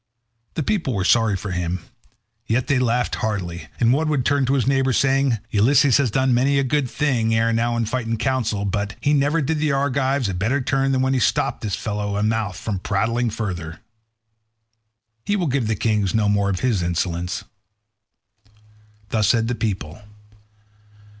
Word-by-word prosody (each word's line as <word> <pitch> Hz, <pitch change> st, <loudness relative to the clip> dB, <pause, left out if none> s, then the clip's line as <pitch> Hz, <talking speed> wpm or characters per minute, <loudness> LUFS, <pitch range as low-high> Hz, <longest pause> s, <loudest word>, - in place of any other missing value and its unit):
The 160 Hz, -, -1 dB
people 165 Hz, -, -1 dB
were 95 Hz, -2 st, -1 dB
sorry 115 Hz, -1 st, +3 dB
for 95 Hz, +1 st, -6 dB
him, 90 Hz, 0 st, -2 dB, 0.6 s
yet 120 Hz, +3 st, +1 dB
they 135 Hz, -3 st, +1 dB
laughed 125 Hz, 0 st, 0 dB
heartily, 90 Hz, -5 st, -3 dB
and 120 Hz, +1 st, +4 dB
one 155 Hz, +3 st, +1 dB
would 140 Hz, -5 st, 0 dB
turn 140 Hz, -2 st, +2 dB
to 135 Hz, -, +2 dB
his 130 Hz, -, +1 dB
neighbour 135 Hz, -1 st, +2 dB
saying, 135 Hz, -1 st, +2 dB
"Ulysses 130 Hz, +5 st, +4 dB
has 140 Hz, -4 st, +1 dB
done 130 Hz, +3 st, +1 dB
many 135 Hz, +3 st, +2 dB
a 135 Hz, -, +2 dB
good 135 Hz, 0 st, 0 dB
thing 115 Hz, -7 st, 0 dB
ere 115 Hz, +1 st, +2 dB
now 120 Hz, +1 st, 0 dB
in 115 Hz, -, 0 dB
fight 115 Hz, +1 st, -3 dB
and 115 Hz, 0 st, -1 dB
council, 115 Hz, -5 st, -1 dB
but 100 Hz, +2 st, -2 dB
he 145 Hz, -, +1 dB
never 145 Hz, +3 st, +2 dB
did 155 Hz, +3 st, -1 dB
the 150 Hz, 0 st, +1 dB
Argives 140 Hz, -2 st, 0 dB
a 95 Hz, -, -2 dB
better 110 Hz, +10 st, 0 dB
turn 135 Hz, +1 st, 0 dB
than 130 Hz, -1 st, +1 dB
when 130 Hz, 0 st, +1 dB
he 130 Hz, -, +1 dB
stopped 110 Hz, -, 0 dB
this 105 Hz, -3 st, -2 dB
fellow's 105 Hz, -1 st, -3 dB
mouth 110 Hz, -3 st, -1 dB
from 100 Hz, -1 st, -3 dB
prating 115 Hz, +5 st, 0 dB
further. 90 Hz, -7 st, -5 dB, 1.4 s
He 205 Hz, -, 0 dB
will 185 Hz, -4 st, 0 dB
give 135 Hz, -5 st, 0 dB
the 110 Hz, -, 0 dB
kings 105 Hz, -2 st, 0 dB
no 110 Hz, -2 st, +2 dB
more 100 Hz, -1 st, +2 dB
of 95 Hz, -2 st, -2 dB
his 120 Hz, -7 st, +1 dB
insolence." 85 Hz, +1 st, -2 dB, 1.7 s
Thus 110 Hz, -2 st, +1 dB
said 115 Hz, +1 st, +2 dB
the -, -, 0 dB
people. 100 Hz, -6 st, -4 dB
115 Hz, 180 wpm, -22 LUFS, 105-135 Hz, 1.7 s, and